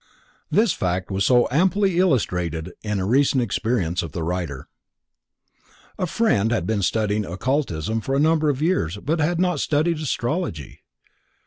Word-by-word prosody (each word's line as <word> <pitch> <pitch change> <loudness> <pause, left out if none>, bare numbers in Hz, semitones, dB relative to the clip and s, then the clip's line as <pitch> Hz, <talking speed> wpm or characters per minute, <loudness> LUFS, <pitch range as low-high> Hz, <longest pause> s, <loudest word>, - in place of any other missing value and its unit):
This 215 -4 +3
fact 90 +1 -2
was 95 +1 0
so 125 -1 +4
amply 190 +4 +2
illustrated 90 - 0
in 105 -2 -2
a 95 - -1
recent 130 +3 +3
experience 95 -6 -1
of 80 -4 -7
the 85 - -3
writer:—A 85 - -8
friend 135 - +1
had 110 -8 0
been 105 0 0
studying 105 +3 0
occultism 110 - -2
for 135 +4 -2
a - - +2
number 155 0 +3
of 145 +1 -1
years 105 - 0
but 155 +10 -2
had 165 +2 +1
not 180 -4 +1
studied 155 +3 +1
astrology. 130 - -3
120 Hz, 145 wpm, -22 LUFS, -, -, so